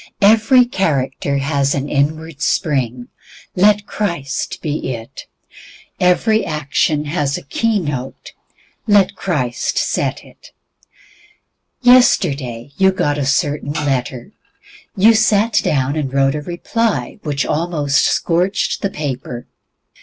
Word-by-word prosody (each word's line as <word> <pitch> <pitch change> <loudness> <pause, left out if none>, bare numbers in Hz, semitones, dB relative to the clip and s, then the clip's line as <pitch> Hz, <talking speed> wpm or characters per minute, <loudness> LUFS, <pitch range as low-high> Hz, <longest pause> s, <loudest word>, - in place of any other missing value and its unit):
Every 225 +4 +5
character 140 - -1
has 140 0 0
an 140 0 -2
inward 155 +2 -2
spring, 130 - -1 0.5
let 205 +2 +3
Christ 170 -10 -3
be 150 -4 -3
it. 115 0 -11 0.7
Every 215 +5 +2
action 150 0 -1
has 145 -2 -1
a - - -9
key 220 +10 0
note, 145 -7 -5 0.6
let 205 -3 +4
Christ 130 -10 -2
set - - -1
it. - - -18 1.3
Yesterday 145 - +3
you 190 -1 +4
got 150 -6 -1
a 135 - -1
certain 145 +1 0
letter. 135 -5 -2 0.7
You 215 +4 +6
sat 215 -1 +3
down 135 0 0
and 145 -4 -2
wrote 135 0 +2
a 150 - -3
reply 205 +9 -2
which 145 -3 -2
almost 150 -4 0
scorched 180 +4 0
the 200 - 0
paper. 130 -7 -5
150 Hz, 115 wpm, -17 LUFS, 140-195 Hz, 1.3 s, You